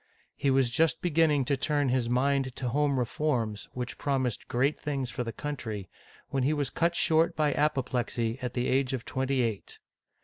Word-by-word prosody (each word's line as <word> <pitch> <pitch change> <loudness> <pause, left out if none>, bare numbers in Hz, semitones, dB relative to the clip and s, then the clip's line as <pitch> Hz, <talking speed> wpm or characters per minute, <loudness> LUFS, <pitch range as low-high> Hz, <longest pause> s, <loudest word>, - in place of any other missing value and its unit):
He 140 - 0
was 130 -2 +3
just 165 +6 +2
beginning 155 -5 +3
to 140 - +1
turn 145 0 +1
his 125 -2 +1
mind 130 +1 +1
to 125 - -2
home 140 +1 +1
reforms, 120 -4 -1
which 125 0 -5
promised 130 -5 -1
great 135 +5 +1
things 135 -4 -2
for 125 - -3
the 115 - -4
country, 110 - -5 0.4
when 135 - 0
he 140 +4 +2
was 145 -2 -1
cut 170 +1 +1
short 165 +1 +3
by 150 -1 +2
apoplexy 125 -5 0
at 125 -1 -4
the 125 0 0
age 135 0 +1
of 125 -2 -3
twenty 130 0 0
eight. 110 -4 -3
135 Hz, 180 wpm, -29 LUFS, 125-145 Hz, 0.4 s, was